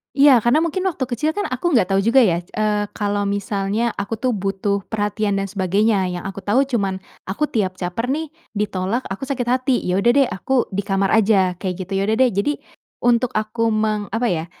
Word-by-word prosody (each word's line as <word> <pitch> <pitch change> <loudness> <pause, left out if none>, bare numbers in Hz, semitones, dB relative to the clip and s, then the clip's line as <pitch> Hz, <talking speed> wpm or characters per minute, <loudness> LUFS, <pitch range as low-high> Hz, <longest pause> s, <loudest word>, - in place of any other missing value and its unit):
Iya 275 -3 +7
karena 240 +8 +3
mungkin 370 +3 -1
waktu 305 -7 -2
kecil 260 +5 -1
kan 410 - -1
aku 280 +5 0
nggak 195 -6 +2
tahu 195 - +3
juga 235 +5 +5
ya 170 -5 +2
c 175 - -14
eee, 210 -1 +1
kalau 205 -1 -1
misalnya 200 +3 -1
aku 200 +3 -2
tuh 250 +3 -1
butuh 200 0 -1
perhatian 205 -1 -1
dan 195 0 -1
sebagainya. 195 +1 +1
Yang 180 -1 -5
aku 195 - -7
tahu 210 +5 +2
cuman 200 -8 -2 0.2
aku 200 +11 -2
tiap 190 -5 0
caper 185 +6 -3
nih 305 +3 -2 0.2
ditolak 205 +3 -1
aku 230 +8 -5
sakit 255 -4 -2
hati, 255 +1 +2
ya 180 +2 0
udah 235 +4 +4
deh 275 -2 +5
aku 245 +7 0
di 200 +1 -1
kamar 195 -1 +1
aja 195 -5 +3
kayak 185 -1 -3
gitu. 185 - -17
Ya - - +1
udah 220 - +2
deh. 255 - +4
Jadi 200 +9 0 0.5
untuk 240 0 +2
aku 215 +2 0
meng 215 -1 0
apa 225 +4 -1
ya, 160 -1 -1
210 Hz, 210 wpm, -20 LUFS, 195-245 Hz, 0.5 s, Iya